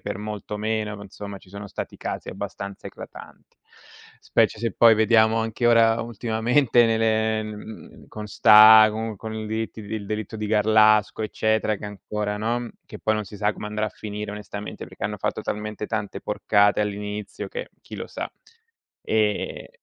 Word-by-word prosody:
per - - -4
molto 105 0 -6
meno. 105 0 -2
Ma 100 - -10
insomma, 100 0 -8
ci 95 - -20
sono 100 +1 -8
stati - - -6
casi - - -5
abbastanza 100 0 -7
eclatanti. - - -12 0.7
Specie - - +2
se 115 -3 -2
poi 115 -1 +6
vediamo 110 0 +4
anche 115 +1 -1
ora 115 -1 +5
ultimamente 115 +2 +2
ne 115 0 +2
ne 110 0 +1
mhmm, 105 0 -10
con 105 -1 -7
sta 110 +1 +8
con 110 0 -4
con 110 +2 -7
i 110 0 -4
delitt 110 +1 -3
il 105 -1 -6
delitto 110 0 -4
di 105 0 -3
Garlasco 110 0 +4
eccetera, 110 0 0
che 105 - -10
ancora, 105 +1 -4
no, 120 +2 -2 0.2
che - - -10
poi 110 - 0
non 110 -1 -2
si 105 - -11
sa 105 +1 +1
come 105 - -7
andrà 105 +1 -2
a - - -1
finire, 105 0 -6
onestamente, 105 0 -7
perché - - -9
hanno - - -3
fatto - - -2
talmente 105 0 -4
tante 110 -3 -4
porcate 105 0 +2
all'inizio 105 0 -4
che, 485 +2 -6
chi - - -10
lo - - -6
sa. - - -6 0.7
Eh 105 -2 -1
110 Hz, 175 wpm, -24 LUFS, 105-110 Hz, 0.7 s, sta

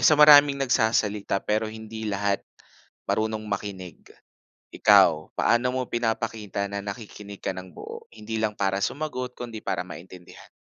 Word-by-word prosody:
sa 155 - +5
maraming 145 -1 +8
nagsasalita 110 -6 +1
pero 110 +1 0
hindi 110 0 -7
lahat 100 -1 0 0.6
marunong 110 0 -1
makinig. 100 -4 -6 0.7
Ikaw, 80 -1 +5
paano 120 +2 +3
mo 130 -1 -2
pinapakita 115 -3 -2
na 100 0 -5
nakikinig 100 -1 -8
ka 95 - -3
ng 90 0 -9
buo - - -9
hindi 110 +1 -5
lang 105 -1 -2
para 95 0 0
sumagot 130 -4 -3
kundi 115 -3 -7
para 90 -2 -2
maintindihan? 90 0 -12
110 Hz, 135 wpm, -25 LUFS, 100-120 Hz, 0.7 s, maraming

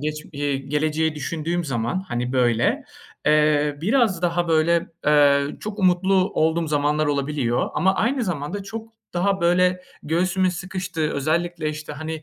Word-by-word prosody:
geç 150 +1 -4
eee, 145 -1 -1
geleceği 155 +3 -1
düşündüğüm 165 +4 -3
zaman, 135 +6 -2
hani, 120 +1 -2
böyle, 120 -2 +2 0.4
eee, 150 -1 +3
biraz 210 - +2
daha 175 0 0
böyle, 165 +1 +2 0.2
eee, 145 -1 +5
çok 215 0 -6
umutlu 185 0 +3 0.2
olduğum 160 +1 +1
zamanlar 150 0 +1
olabiliyor. 140 -4 0
Ama 190 +1 +2
aynı 240 +5 0
zamanda 180 +2 -3
çok 220 +3 -7 0.3
daha 195 +2 +1
böyle 180 +1 +2 0.2
göğsümün 185 +4 +1
sıkıştığı, 180 -3 -3
özellikle, 160 +3 -1
işte, 150 0 -6
hani, 155 +1 -6
160 Hz, 135 wpm, -23 LUFS, 145-180 Hz, 0.4 s, eee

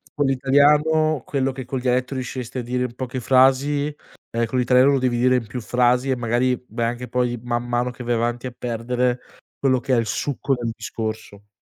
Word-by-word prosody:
co' 145 - +1
l'italiano 145 +3 +3
quello 135 -1 0
che 130 -1 -7
col 130 +1 -4
dialetto 125 +1 0
riusciresti 130 -1 -5
a - - -4
dire 125 +1 -1
in 120 -1 -7
poche 130 0 -4
frasi, 135 +4 +3 0.4
ehm, 115 0 0
co' 115 +3 -6
l'italiano 125 +2 +4
lo 140 - +2
devi 125 -2 0
dire 130 +1 +3
in 125 -2 0
più 125 +4 -6
frasi 125 +2 +1
e 130 - +2
magari, 120 +1 +1
beh, 125 -1 -6
anche 120 +2 -3
poi, 120 0 0
man 120 0 -2
mano 120 +1 0
che 125 0 -9
vai 120 - +1
avanti, 120 +2 -1
a 125 - -9
perdere 125 +1 -1 0.4
quello 130 -2 +2
che 135 -1 -1
è - - +4
il 115 - +1
succo 140 +4 -1
del 120 -2 -3
discorso. 110 -3 -6
125 Hz, 205 wpm, -22 LUFS, 120-130 Hz, 0.4 s, l'italiano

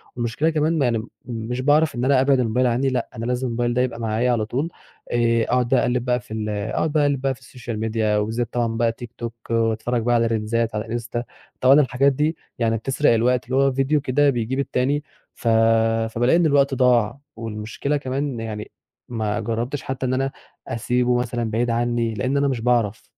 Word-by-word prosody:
والمشكلة 120 +6 0
كمان 155 0 +1
يعني، 115 -4 +1 0.2
مش 120 +1 -4
باعرف 145 +2 +3
إن 120 +1 -1
أنا 135 -1 +4
أبعِد 135 0 +3
الموبايل 125 +1 +2
عندي، 125 +3 +1
لأ، 130 - -2
أنا 115 0 -4
لازم 125 +1 -1
الموبايل 120 0 -1
ده 125 - +2
يبقى 125 -2 -2
معايا 115 +2 0
على 115 -3 +1
طول، 135 +9 -2 0.4
آآ 115 -1 +2
أقعد 125 +1 +1
بقى 130 - +4
أقلِّب 125 0 0
بقى 125 -1 +1
في 120 - -18
ال 110 -1 -3
أقعد 110 +9 -1
أقلِّب 145 -3 +2
بقى 135 -1 +1
في 130 - -15
السوشيال 120 -3 -7
ميديا، 110 -1 0
وبالذات 110 +3 -2
طبعًا 115 -2 0
بقى 115 0 +2
تيك 115 0 -10
توك، 115 -1 -5 0.2
وأتفرج 115 +1 0
بقى 120 +1 +2
على 115 0 +3
ريلزات 115 0 -1
على 105 +1 -2
الإنستا، 120 +1 -4 0.4
طبعًا 135 +3 +7
الحاجات 135 +1 +2
دي 150 +4 0 0.2
يعني 115 -1 +1
بتسرق 135 +4 +2
الوقت، 125 +2 +2
اللي 125 +2 -3
هو 135 0 +4
فيديو 135 +3 +1
كده 145 +2 +2
بيجيب 125 +1 -1
التاني، 140 +2 0 0.3
ف - - -7 0.6
فبالاقي 120 +5 +2
إن 175 - +3
الوقت 140 -2 +3
ضاع، 125 -1 +2 0.2
والمشكلة 115 +6 -3
كمان 135 -2 -3
يعني، 110 -1 -6 0.4
ما 110 -3 -2
جربتش 120 +5 -3
حتى 130 -2 -3
إن 130 - 0
أنا 135 +1 0 0.4
أسيبه 125 +2 +1
مثلًا 120 -2 -2
بعيد 120 +2 0
عني، 120 -1 0
لإن 130 +6 -1
أنا 140 0 +2
مش 130 -4 -1
باعرف. 115 -3 +1
120 Hz, 195 wpm, -22 LUFS, 115-135 Hz, 0.6 s, طبعًا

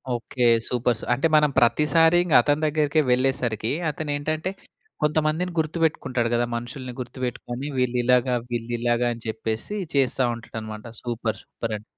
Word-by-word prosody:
Okay. 120 +1 -2 0.2
Supers. 120 -2 0
అంటే 135 +7 +2
మనం 150 -1 +5
ప్రతిసారి 160 +7 +4
ఇంగ 175 -4 -2
అతని 145 +4 +1
దగ్గరికే 150 0 +2
వెళ్ళేసరికి, 125 -4 +1 0.2
అతనేంటంటె 155 +3 -2 0.5
కొంతమందిని 155 +4 +1
గుర్తువెట్టుకుంటాడు 155 -7 0
గదా! 120 0 +2
మనుషుల్ని 125 +2 -6
గుర్తుపెట్టుకొని 125 +1 -5
వీళ్ళిలాగ, 125 0 +2 0.2
వీళ్ళిలాగ 120 0 -1
అని 115 -1 -12
చెప్పేసి 110 - -3 0.2
చేస్తా 135 -1 +2
ఉంటాడన్నమాట. 110 -2 -8 0.2
సూపర్. 115 -2 -2
సూపరండి. 110 -2 -5
125 Hz, 115 wpm, -24 LUFS, 120-150 Hz, 0.5 s, మనం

